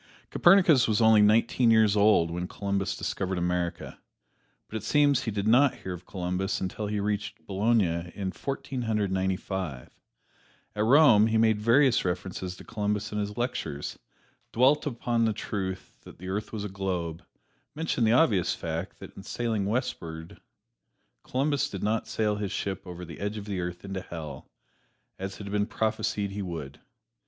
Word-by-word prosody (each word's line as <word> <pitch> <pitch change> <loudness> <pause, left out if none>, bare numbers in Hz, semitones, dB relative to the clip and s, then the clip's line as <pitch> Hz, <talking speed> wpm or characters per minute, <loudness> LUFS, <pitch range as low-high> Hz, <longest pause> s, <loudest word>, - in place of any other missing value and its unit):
Copernicus 175 -8 +5
was 110 -2 +2
only 110 -2 +6
nineteen 115 +3 +4
years 110 -2 +5
old 100 -5 +4
when 90 +1 -3
Columbus 100 0 -2
discovered 95 0 -2
America, 90 0 -2 0.7
but - - -9
it - - -6
seems 145 +3 +3
he - - -3
did 100 -1 -2
not 130 +4 +5
hear 95 - -6
of 90 0 -10
Columbus 90 +1 -2
until 95 +3 -3
he 105 0 -2
reached 105 0 -3
Bologna 95 -5 +1
in 95 -2 -3
Fourteen 135 - -4
Hundred 105 -4 0
Ninety 95 0 +1
five. 90 -12 -5 0.8
At 105 +1 +1
Rome 120 -5 +6
he 110 0 +1
made 110 -1 +3
various 125 +3 +4
references 90 0 -4
to - - -11
Columbus 105 -1 -2
in 105 - -2
his 105 0 -4
lectures; 80 - -3 0.5
dwelt 135 +6 +3
upon 120 -3 0
the 110 - +1
truth 95 -2 -5
that - - -14
the 95 +2 -8
earth 105 +3 -3
was 110 -2 -4
a - - -3
globe; 90 -4 -3 0.5
mentioned 150 -6 0
the 110 - +4
obvious 110 - +3
fact 85 +3 -5
that - - -12
in - - -9
sailing 110 -1 -2
westward 85 -8 -4 0.8
Columbus 140 +2 0
did 100 - -6
not 110 +1 0
sail 105 -2 0
his 105 -2 -3
ship 95 -1 -4
over 90 0 -7
the 80 -2 -10
edge 105 +2 -3
of 100 - -6
the 100 -3 -3
earth 90 +1 -5
into 95 -1 -4
Hell, 80 -4 -8 0.7
as 95 0 -5
had 100 -1 -7
been 105 0 +1
prophesied 105 -2 -1
he 100 +1 -4
would. 80 -7 -6
105 Hz, 170 wpm, -28 LUFS, 95-110 Hz, 0.8 s, only